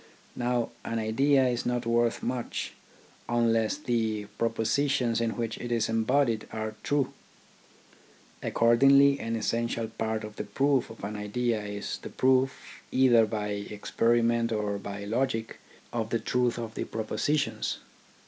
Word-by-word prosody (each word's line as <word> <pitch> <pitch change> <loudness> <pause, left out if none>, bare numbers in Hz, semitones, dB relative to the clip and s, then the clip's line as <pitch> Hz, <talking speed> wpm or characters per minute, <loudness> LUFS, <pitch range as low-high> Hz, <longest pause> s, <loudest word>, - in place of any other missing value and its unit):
Now 120 -1 0
an 115 - -3
idea 130 +5 +3
is 120 -1 -1
not 125 -1 -1
worth 115 0 +1
much 125 -1 -3 0.6
unless 115 0 +2
the 110 -6 -1
propositions 115 +1 +1
in 115 -1 -1
which 115 -1 -3
it 120 - -5
is 115 -2 +1
embodied 115 0 +1
are 110 -1 -3
true. 145 -2 0 1.3
Accordingly 140 +4 +5
an 115 0 -2
essential 115 0 -1
part 110 0 -2
of 105 0 -8
the - - -2
proof 135 +6 +1
of 115 - -12
an 105 +1 -4
idea 110 +2 -1
is 100 0 -5
the - - -8
proof, 130 +1 +1
either 120 -4 +5
by 105 -1 -3
experiment 115 +3 +1
or 105 -2 -1
by 100 0 -6
logic, 115 0 -1 0.3
of 115 -2 -1
the 115 - +1
truth 120 +1 0
of 115 -2 -5
the - - -3
propositions. 145 +7 -1
115 Hz, 140 wpm, -28 LUFS, 110-125 Hz, 1.3 s, Accordingly